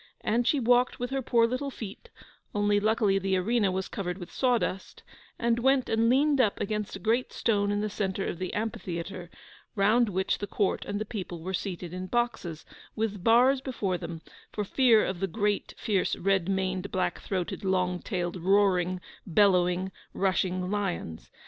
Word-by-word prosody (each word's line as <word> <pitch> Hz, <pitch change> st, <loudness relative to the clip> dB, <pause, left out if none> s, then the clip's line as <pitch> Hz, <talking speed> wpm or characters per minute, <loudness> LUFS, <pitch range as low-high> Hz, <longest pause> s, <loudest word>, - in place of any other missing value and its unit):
And 235 Hz, +2 st, +1 dB
she 290 Hz, -, +3 dB
walked 245 Hz, +1 st, +3 dB
with 245 Hz, +1 st, -3 dB
her 270 Hz, 0 st, 0 dB
poor 235 Hz, -2 st, +3 dB
little 255 Hz, +4 st, -2 dB
feet 225 Hz, -, -9 dB, 0.5 s
(only 205 Hz, 0 st, +3 dB
luckily 210 Hz, -2 st, +2 dB
the 190 Hz, 0 st, 0 dB
arena 205 Hz, +1 st, +1 dB
was 190 Hz, 0 st, -2 dB
covered 180 Hz, -2 st, -4 dB
with 175 Hz, -2 st, -9 dB
sawdust), 240 Hz, -7 st, -1 dB, 0.3 s
and 235 Hz, 0 st, +1 dB
went 265 Hz, +1 st, +2 dB
and 225 Hz, +1 st, +3 dB
leaned 280 Hz, +2 st, +4 dB
up 215 Hz, -5 st, +1 dB
against 210 Hz, -1 st, -2 dB
a -, -, -7 dB
great 230 Hz, +6 st, 0 dB
stone 205 Hz, -3 st, +1 dB
in 205 Hz, 0 st, 0 dB
the 215 Hz, -, 0 dB
centre 195 Hz, -2 st, -2 dB
of 175 Hz, -, -4 dB
the 185 Hz, -1 st, -3 dB
amphitheatre, 185 Hz, -4 st, -4 dB, 0.5 s
round 215 Hz, +3 st, +3 dB
which 190 Hz, 0 st, 0 dB
the 205 Hz, -, -4 dB
Court 200 Hz, 0 st, 0 dB
and 205 Hz, 0 st, -3 dB
the 215 Hz, -, -3 dB
people 180 Hz, -6 st, -6 dB
were 190 Hz, +2 st, -4 dB
seated 180 Hz, -3 st, -4 dB
in 185 Hz, 0 st, -5 dB
boxes, 225 Hz, -8 st, -2 dB, 0.3 s
with 210 Hz, -4 st, -2 dB
bars 250 Hz, +5 st, +5 dB
before 205 Hz, -9 st, -2 dB
them, 165 Hz, -1 st, -7 dB, 0.3 s
for 210 Hz, -, -2 dB
fear 235 Hz, 0 st, +4 dB
of 185 Hz, -2 st, -3 dB
the 195 Hz, -, 0 dB
great, 205 Hz, +2 st, -1 dB
fierce, 200 Hz, -5 st, 0 dB
red 195 Hz, -1 st, +1 dB
maned, 190 Hz, 0 st, -1 dB
black 185 Hz, -1 st, -1 dB
throated, 185 Hz, 0 st, -3 dB
long 180 Hz, -1 st, +1 dB
tailed, 175 Hz, -2 st, -3 dB
roaring, 185 Hz, -1 st, +2 dB, 0.3 s
bellowing, 180 Hz, 0 st, +3 dB, 0.2 s
rushing 185 Hz, -1 st, 0 dB
lions. 185 Hz, -, -3 dB
200 Hz, 175 wpm, -28 LUFS, 185-230 Hz, 0.5 s, bars